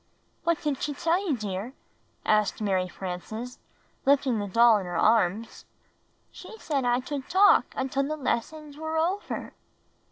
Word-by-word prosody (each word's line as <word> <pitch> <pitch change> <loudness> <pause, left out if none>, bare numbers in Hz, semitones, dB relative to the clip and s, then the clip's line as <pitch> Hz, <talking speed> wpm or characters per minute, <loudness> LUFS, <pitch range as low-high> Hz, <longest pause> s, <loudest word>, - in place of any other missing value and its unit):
"What 335 -1 +2
did 295 -3 0
^he 290 +1 -4
tell 340 +4 +1
you, 280 - +1
dear? 210 +3 -5 0.3
" - - -40
asked 215 -1 +2
Mary 190 -4 0
Frances, 195 +7 -6 0.4
lifting 270 -4 +3
the 205 - -3
doll 230 +2 +5
in 190 - -6
her 175 -1 -3
arms. 220 +2 +1 0.7
"She 445 - -11
said 285 - -2
that 245 - +3
I 245 - +2
tould 275 0 -6
talk 400 +2 +5
until 265 +1 -1
the 310 +1 -3
lessons 295 +3 -3
were 315 +1 -3
over." 360 +6 -2
255 Hz, 160 wpm, -27 LUFS, 215-305 Hz, 0.7 s, doll